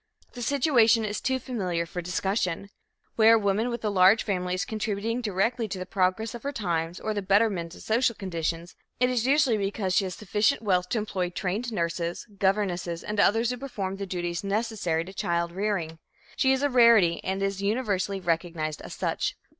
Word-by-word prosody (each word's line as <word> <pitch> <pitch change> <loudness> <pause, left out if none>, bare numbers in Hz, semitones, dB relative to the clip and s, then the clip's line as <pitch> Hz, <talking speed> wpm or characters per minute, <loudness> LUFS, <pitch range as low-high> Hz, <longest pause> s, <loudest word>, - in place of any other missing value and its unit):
The 245 - -8
situation 240 -5 +3
is 210 0 -3
too 260 0 0
familiar 190 -10 -2
for 175 +1 -5
discussion. 185 +1 -2 0.5
Where 225 0 +7
a - - +3
woman 205 +3 +1
with 235 -2 -4
a 210 - +1
large 190 +3 +5
family 180 -3 -1
is 185 - -2
contributing 220 +2 -2
directly 225 +2 0
to 195 - -5
the 185 - -5
progress 190 +3 0
of 240 - -7
her 280 - -3
times 170 - -2
or 215 - -2
the 205 - -2
betterment 195 -4 +1
of - - -12
social 235 +1 +1
conditions, 170 -3 -4 0.2
it 250 0 +3
is 245 -1 0
usually 270 -5 +3
because 195 -1 -1
she 195 - +3
has 185 -2 -5
sufficient 215 +5 +1
wealth 180 -3 +1
to - - 0
employ 190 -4 -2
trained 200 +7 -3
nurses, 170 -2 -2
governesses, 185 -4 0
and 210 0 -3
others 225 +4 +3
who 250 - -4
perform 200 -8 -4
the 200 0 -5
duties 175 -1 -3
necessary 200 -5 -1
to 190 - -10
child 170 -2 -1
rearing. 175 -4 -2 0.4
She 265 - +3
is 265 +1 +1
a 285 - +3
rarity 230 -9 +5
and 190 +1 -2
is 195 0 -2
universally 200 -3 -1
recognized 165 -3 -2
as - - -8
such. - - -1
200 Hz, 190 wpm, -27 LUFS, 180-225 Hz, 0.5 s, Where